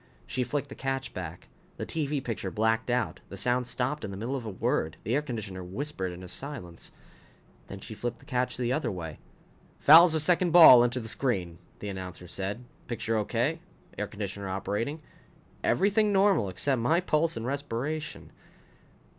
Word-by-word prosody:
She 125 - -2
flicked 145 +2 -3
the - - -7
catch 135 0 -3
back. 90 -1 -7 0.3
The - - -4
TV 150 -3 -2
picture 110 -5 -3
blacked 110 +3 0
out. 115 -8 0
The 100 - -8
sound 125 +4 +1
stopped 130 +5 -2
in - - -4
the 95 - -6
middle 120 +7 -3
of 120 -4 -5
a - - -2
word. 80 -5 -1
The 115 - -1
air 145 - +3
conditioner 110 -9 -6
whispered 95 0 -4
into 90 +1 -9
silence. 90 - -7 0.8
Then 100 - -8
she 110 - -8
flipped 120 +2 -4
the - - -19
catch 125 -3 -1
the 125 0 0
other 155 - -1
way. 80 -5 -6 0.3
" - - -31
fouls 165 +3 +10
the 160 - +2
second 175 +3 +3
ball 155 -8 +10
into 120 +1 0
the 110 - -7
screen," 95 -9 -2 0.2
the 105 - -4
announcer 90 -2 -7
said. 100 +6 -4 0.2
Picture 115 -1 -2
okay. 120 +9 0 0.4
Air 105 - -3
conditioner 100 -2 -5
operating. 105 +11 -3 0.6
Everything 205 +2 +3
normal 195 - +3
except 125 +7 0
my 160 +9 +3
pulse 165 -4 +1
and 115 - -4
respiration. 140 +3 -4
120 Hz, 175 wpm, -28 LUFS, 100-145 Hz, 0.8 s, fouls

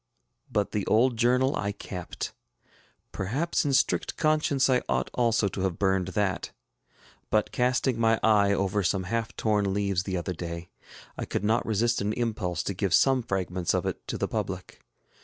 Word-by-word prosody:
But 105 -1 0
the 105 - -1
old 120 +3 +3
journal 125 +4 +2
I 100 0 -2
kept. 90 -3 -6 0.8
Perhaps 140 - -1
in 145 - +1
strict - - +1
conscience 155 -3 +2
I 125 -2 +3
ought - - 0
also 115 -4 +2
to 95 - -5
have 95 -3 -1
burned 95 -2 +1
that; 100 -2 0 0.8
but 105 0 +1
casting 125 0 +1
my 115 0 +3
eye 105 -2 +4
over 100 +1 +1
some 95 +1 0
half 115 +4 -2
torn 105 -3 +1
leaves 100 -3 +1
the 95 -1 -3
other 85 +1 -3
day, 85 0 -6 0.5
I - - -2
could - - -3
not 110 +3 +1
resist 115 +2 +1
an 105 +1 0
impulse 105 -8 -2
to 100 - -2
give 95 -1 +1
some 135 -1 +4
fragments 95 -5 -1
of - - -1
it - - -4
to - - -3
the - - -1
public. - - -4
105 Hz, 175 wpm, -27 LUFS, 95-120 Hz, 0.8 s, eye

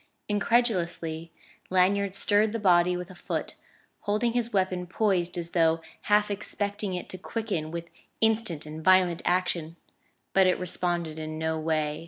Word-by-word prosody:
Incredulously 180 -7 0 0.4
Lanyard 190 +1 +2
stirred 210 +2 +3
the - - 0
body 180 -3 +4
with 180 +1 -7
a - - -10
foot, 175 - -4 0.5
holding 220 +3 0
his 240 -1 0
weapon 185 -2 0
poised 180 -3 0
as 170 -1 -4
though 165 -1 +3 0.3
half 210 0 +4
expecting 205 -1 -3
it 180 - -5
to 185 - -7
quicken 200 -7 -3
with 170 +1 -5 0.3
instant 220 -9 +1
and 155 +1 -8
violent 185 -2 +4
action; 175 -3 0 0.6
but 190 -1 +5
it 185 - +3
responded 175 -3 -2
in 155 0 -5
no 160 0 -1
way. 155 -1 -1
180 Hz, 150 wpm, -27 LUFS, 165-205 Hz, 0.6 s, but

